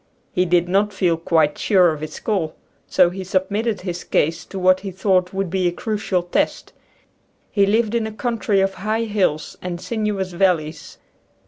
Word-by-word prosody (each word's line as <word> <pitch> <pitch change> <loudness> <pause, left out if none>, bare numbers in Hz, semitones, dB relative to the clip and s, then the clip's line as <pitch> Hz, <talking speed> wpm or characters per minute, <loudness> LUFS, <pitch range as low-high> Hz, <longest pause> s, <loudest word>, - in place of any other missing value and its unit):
He 180 - +2
did 175 0 +2
not 200 +3 +2
feel 180 -3 +1
quite 160 -2 +1
sure 185 -4 +4
of 150 - -8
his 155 - -6
call, 185 -8 -1 0.3
so 175 - +4
he 190 +1 -6
submitted 200 +4 -1
his 180 -2 -5
case 165 +3 0
to 195 - -8
what 185 0 +4
he 195 - -6
thought 185 -1 +1
would 195 -2 -2
be 185 -1 +1
a - - +1
crucial 205 -1 -2
test. 175 - -1 0.8
He 200 -2 +3
lived 220 +1 +2
in 230 -2 0
a - - -6
country 215 -3 0
of 195 0 +1
high 215 +4 -1
hills 195 -8 -1
and 175 -1 -4
sinuous 210 -2 -2
valleys. 170 -4 0
190 Hz, 180 wpm, -21 LUFS, 175-210 Hz, 0.8 s, sure